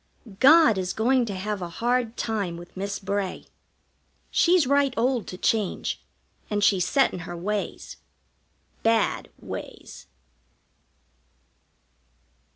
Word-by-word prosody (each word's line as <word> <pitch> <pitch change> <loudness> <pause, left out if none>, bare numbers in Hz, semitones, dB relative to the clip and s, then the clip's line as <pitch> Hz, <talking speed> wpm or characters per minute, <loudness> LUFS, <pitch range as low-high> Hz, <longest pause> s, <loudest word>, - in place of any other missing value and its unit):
God 300 -6 +6
is 180 -1 -2
going 250 +2 +2
to 200 - -4
have 200 +1 -3
a 175 - -4
hard 240 +4 -1
time 200 -7 -2
with 175 +1 -12
Miss 200 +1 -3
Bray. 200 -1 -3 0.9
She's 350 -3 +4
right 280 +1 +3
old 245 -1 +1
to 180 - -7
change, 210 0 -1 0.5
and 205 -1 0
she's 185 -3 +3
set 270 +8 +3
in - - -5
her 175 0 -7
ways 205 +3 -4 0.8
bad 225 -1 +1
ways. - - -9
210 Hz, 115 wpm, -25 LUFS, 185-250 Hz, 0.9 s, God